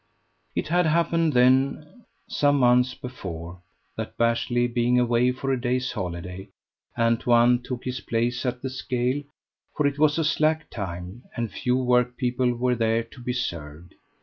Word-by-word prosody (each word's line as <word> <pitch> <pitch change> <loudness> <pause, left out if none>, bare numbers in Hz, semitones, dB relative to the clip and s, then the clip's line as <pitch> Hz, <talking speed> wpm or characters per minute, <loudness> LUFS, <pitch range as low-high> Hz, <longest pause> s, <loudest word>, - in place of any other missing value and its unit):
It - - -2
had 175 0 +3
happened, 165 0 +2
then, 135 - +2 0.2
some 145 -10 +2
months 125 0 +4
before, 90 -8 -8 0.4
that - - -6
Bashley 120 +1 +1
being 120 +1 +2
away 120 +1 +3
for 135 +1 -3
a 130 -2 -1
day's 125 +1 0
holiday, 90 -2 -6 0.5
Antoine 120 +1 +3
took 125 0 -6
his 125 0 -3
place 120 +2 -1
at 125 -1 -3
the 135 - -2
scale; 130 +1 -1 0.6
for 150 - +2
it 140 0 0
was 150 0 +4
a 165 - +1
slack 155 0 +1
time, 95 +2 -6
and 115 -2 -3
few 125 0 0
workpeople 125 0 +1
were 125 +1 +1
there 115 -1 +1
to 115 +2 -15
be 125 +1 -2
served. 85 - -5
125 Hz, 150 wpm, -25 LUFS, 115-130 Hz, 0.6 s, months